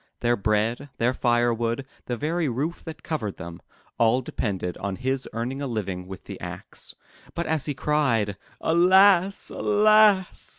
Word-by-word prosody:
Their 120 0 +2
bread, 110 +6 0
their 120 +2 +1
firewood, 120 0 0 0.2
the 120 - -2
very 160 +3 -1
roof 145 +8 -3
that 160 -2 -8
covered 110 - -3
them, 85 0 -9 0.4
all 115 +3 +3
depended 95 -7 -3
on 100 -1 -4
his 130 +3 -2
earning 120 +5 -4
a 140 - -2
living 95 -6 -4
with 95 -1 -9
the - - -9
axe. - - -8 0.4
But 170 - -2
as 160 -3 -1
he 145 - -2
cried, 130 -10 +1 0.3
Alas! 190 +3 +4
Alas!' 210 -2 +3
125 Hz, 145 wpm, -25 LUFS, 110-160 Hz, 0.4 s, Alas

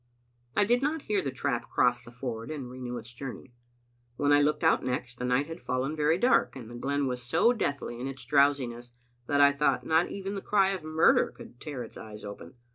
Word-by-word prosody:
I 205 - +4
did 240 +4 +2
not 295 +2 -1
hear 205 -2 +1
the 140 - -2
trap 125 -2 -2
cross 120 0 +2
the - - -13
ford 120 -2 -6
and 135 -5 -6
renew 125 -1 -5
its 115 +1 -9
journey. 130 0 -8 0.6
When 145 +2 +2
I 145 - +6
looked 150 +2 +1
out 160 - +4
next, 125 -1 -3
the 125 - -2
night 125 +3 +2
had 165 +2 -8
fallen 130 +4 -2
very 155 +2 +2
dark, 245 - +3
and 120 -3 -9
the - - -8
glen 140 +3 -1
was 125 -1 -2
so 130 - +3
deathly 140 - -3
in 130 - -3
its 135 0 -7
drowsiness 130 -4 +1 0.3
that 145 0 +3
I 140 0 +7
thought 145 +1 +1
not 160 +2 +3
even 195 0 -5
the 200 - -4
cry 195 -2 +3
of 190 -4 -4
murder 155 +1 +4
could 120 - -14
tear 145 -6 -5
its 115 - -11
eyes 105 -1 -10
open. 100 +4 -9
140 Hz, 220 wpm, -29 LUFS, 125-155 Hz, 0.6 s, I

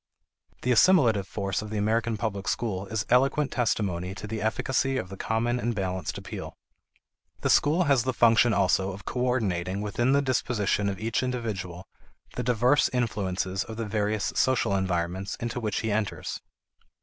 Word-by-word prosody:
The 125 - +1
assimilative 120 - +4
force 100 -1 -2
of 105 - -7
the 110 - -3
American 110 +2 0
public 100 -3 -3
school 100 -1 -2
is 110 +2 -2
eloquent 135 +3 +3
testimony 95 -6 -1
to - - -7
the 110 +1 -4
efficacy 130 +4 0
of 95 - -4
the 95 - -7
common 115 +4 -1
and 120 -1 -1
balanced 95 -2 -3
appeal. - - -7 0.8
The - - +2
school 155 +5 +4
has 140 -6 +3
the 130 +3 0
function 120 -1 +4
also 95 -1 +2
of 95 +1 -11
coordinating 100 -8 -1
within 120 +5 0
the 140 0 +3
disposition 115 -6 0
of 95 - -4
each 115 +2 -1
individual 100 -8 -4 0.5
the - - -2
diverse 125 +3 +3
influences 95 -5 -1
of 110 0 -9
the 115 - -2
various 105 0 -1
social 130 -6 +2
environments 95 0 -1
into 120 +1 -4
which 110 -3 -2
he 110 - -1
enters. 105 0 -2
110 Hz, 160 wpm, -27 LUFS, 95-120 Hz, 0.8 s, assimilative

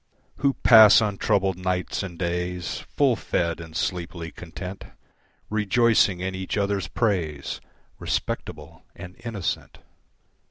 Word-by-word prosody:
Who 140 -2 +1
pass 110 -4 +9
untroubled 100 -3 0
nights 90 0 -2
and 90 -3 -7
days 90 0 -3
Full - - +1
fed 85 -1 -2
and 80 -1 -7
sleepily 85 -2 -3
content, 90 +4 -8 0.6
Rejoicing 110 -2 +2
in 95 +1 -2
each 95 +2 -4
other's 100 -3 0
praise, 85 - -2 0.4
Respectable 75 +2 -4
and 90 +1 -10
innocent. 110 -6 -4
95 Hz, 110 wpm, -25 LUFS, 85-105 Hz, 0.6 s, pass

